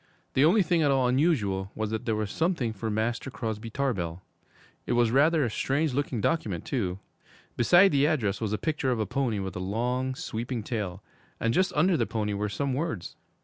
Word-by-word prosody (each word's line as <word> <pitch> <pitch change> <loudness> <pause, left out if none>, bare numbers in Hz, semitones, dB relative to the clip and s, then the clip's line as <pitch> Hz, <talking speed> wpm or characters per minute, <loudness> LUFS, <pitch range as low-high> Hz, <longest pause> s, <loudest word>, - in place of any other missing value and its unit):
The 135 - +4
only 195 +5 +5
thing 170 -1 +2
at 145 - +3
all 135 -2 +3
unusual 115 - +1
was 110 -1 -2
that 110 - -3
there 110 - +1
was 105 -2 -2
something 160 -9 0
for 110 +2 -4
Master 115 +4 -1
Crosby 115 -3 -4
Tarbell. 95 -10 -2 0.6
It - - +1
was 120 -1 +3
rather 145 +3 +4
a - - -1
strange 140 +5 0
looking 135 -3 -1
document, 105 - -1
too. 95 -9 -2 0.6
Beside 175 - +6
the 145 0 +3
address 115 - 0
was 110 -2 -1
a 105 - 0
picture 150 0 -1
of 125 -3 0
a 110 - +1
pony 120 0 -1
with 95 -2 -4
a - - -3
long, 125 +7 -1
sweeping 120 -5 -4
tail, 105 -5 -4 0.4
and 115 0 +1
just 185 +6 +2
under 170 +3 +3
the - - 0
pony 105 -1 -2
were 105 +1 -2
some 140 +5 -2
words. 135 - -3
120 Hz, 200 wpm, -27 LUFS, 105-145 Hz, 0.6 s, Beside